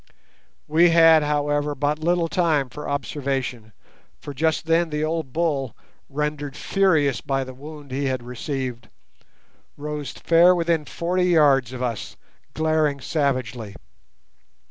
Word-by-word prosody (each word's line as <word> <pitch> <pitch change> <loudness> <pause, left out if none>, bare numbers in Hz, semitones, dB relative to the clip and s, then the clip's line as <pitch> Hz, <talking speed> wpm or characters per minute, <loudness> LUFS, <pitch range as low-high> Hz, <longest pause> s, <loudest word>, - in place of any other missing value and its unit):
We 165 +3 +5
had, 165 -1 +6
however, 145 0 0
but 145 +2 -1
little 170 +1 +1
time 160 -7 +1
for 150 +3 -7
observation, 135 -5 -3 0.5
for 145 - -8
just 160 +3 0
then 165 +1 +2
the 150 0 -2
old 155 -3 -2
bull, 145 -7 -1 0.3
rendered 145 -1 -3
furious 160 - +2
by 135 -1 -1
the 130 0 -9
wound 145 +1 -11
he 140 +2 -2
had 130 -2 -2
received, 125 -1 -5 0.9
rose 150 -2 -5
fair 170 +2 +4
within 165 -3 0
forty 180 +3 -1
yards 145 -8 +4
of 130 -1 -5
us, 115 -4 -4 0.4
glaring 155 -2 +1
savagely. 130 - -2
145 Hz, 125 wpm, -23 LUFS, 135-160 Hz, 0.9 s, had